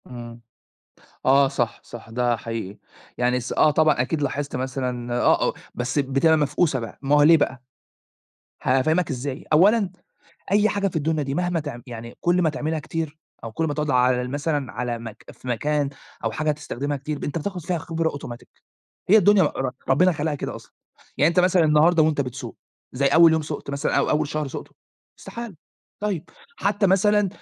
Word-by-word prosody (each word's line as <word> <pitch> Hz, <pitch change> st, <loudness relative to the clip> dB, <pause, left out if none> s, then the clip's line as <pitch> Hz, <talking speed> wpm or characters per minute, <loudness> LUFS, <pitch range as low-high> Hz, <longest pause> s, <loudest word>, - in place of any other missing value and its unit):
إمم. 120 Hz, -1 st, -9 dB, 0.8 s
آه، 135 Hz, +1 st, +5 dB
صح، 125 Hz, -4 st, -2 dB
صح، 115 Hz, -1 st, -11 dB
ده 120 Hz, +1 st, +1 dB
حقيقي. 110 Hz, -3 st, -6 dB, 0.4 s
يعني 125 Hz, +1 st, +2 dB
الس 125 Hz, -1 st, -4 dB
آه 155 Hz, -, +4 dB
طبعًا 155 Hz, -3 st, +3 dB
أكيد 150 Hz, +5 st, -2 dB
لاحظت 140 Hz, 0 st, -2 dB
مثلًا، 125 Hz, -2 st, -3 dB
آه، -, -, +4 dB
آه -, -, -3 dB, 0.2 s
بس 125 Hz, +4 st, -1 dB
بتبقى 140 Hz, +4 st, +3 dB
مفقوسة 145 Hz, -1 st, +1 dB
بقى، 115 Hz, -2 st, -8 dB
ما 140 Hz, +1 st, +2 dB
هو 145 Hz, -, +5 dB
ليه 165 Hz, +2 st, +7 dB
بقى؟ 135 Hz, -3 st, -1 dB, 1.0 s
هافهمك 155 Hz, +8 st, +2 dB
إزاي، 135 Hz, 0 st, -4 dB
أولًا 200 Hz, +5 st, +5 dB, 0.6 s
أي 205 Hz, +1 st, +4 dB
حاجة 200 Hz, -1 st, 0 dB
في 175 Hz, -, -7 dB
الدنيا 155 Hz, 0 st, 0 dB
دي 135 Hz, -1 st, -3 dB
مهما 175 Hz, 0 st, 0 dB
تع 145 Hz, -5 st, -6 dB
يعني 115 Hz, -1 st, -9 dB
كل 175 Hz, +1 st, +2 dB
ما 160 Hz, -, +3 dB
تعملها 155 Hz, +2 st, -2 dB
كتير 155 Hz, 0 st, -5 dB, 0.3 s
أو 115 Hz, -, -6 dB
كل 165 Hz, -, -1 dB
ما 145 Hz, -, -2 dB
تقعد 150 Hz, 0 st, -1 dB
على 125 Hz, 0 st, +3 dB
ال 125 Hz, -, -5 dB
مثلًا 145 Hz, -3 st, -2 dB
على 120 Hz, +1 st, -3 dB
مك 115 Hz, -2 st, -10 dB
في 130 Hz, -, -12 dB
مكان 145 Hz, +4 st, 0 dB, 0.4 s
أو 115 Hz, -, +1 dB
حاجة 155 Hz, +7 st, -2 dB
هتستخدمها 145 Hz, -1 st, -3 dB
كتير، 150 Hz, +2 st, -4 dB
أنت 145 Hz, -, -2 dB
بتاخد 185 Hz, +3 st, -4 dB
فيها 170 Hz, +1 st, -2 dB
خبرة 165 Hz, 0 st, -2 dB
automatic، 125 Hz, -4 st, -9 dB, 0.6 s
هي 215 Hz, -, +8 dB
الدنيا 205 Hz, -1 st, +5 dB
ر 135 Hz, -3 st, -1 dB, 0.2 s
ربنا 180 Hz, +8 st, +4 dB
خلقها 150 Hz, -1 st, -2 dB
كده 145 Hz, -, -5 dB
أصلًا، -, -, -15 dB, 0.5 s
يعني 150 Hz, -, +5 dB
أنت 170 Hz, +2 st, +3 dB
مثلًا 180 Hz, -1 st, +4 dB
النهارده 155 Hz, +2 st, +4 dB
وأنت 155 Hz, -2 st, +2 dB
بتسوق 125 Hz, -2 st, -5 dB, 0.4 s
زي 140 Hz, +2 st, +1 dB
أول 165 Hz, +3 st, +6 dB
يوم 160 Hz, 0 st, +1 dB
سُقت 150 Hz, -2 st, -6 dB
مثلًا 140 Hz, +2 st, 0 dB
أو -, -, +1 dB
أول 150 Hz, -1 st, +1 dB
شهر 150 Hz, -1 st, -2 dB
سُقته؟ -, -, -8 dB, 0.4 s
استحالة. 235 Hz, -6 st, -8 dB, 0.4 s
طيب، 200 Hz, -6 st, -3 dB, 0.3 s
حتى 200 Hz, +1 st, +1 dB
مثلًا 205 Hz, +2 st, +3 dB
145 Hz, 185 wpm, -23 LUFS, 130-165 Hz, 1.0 s, هي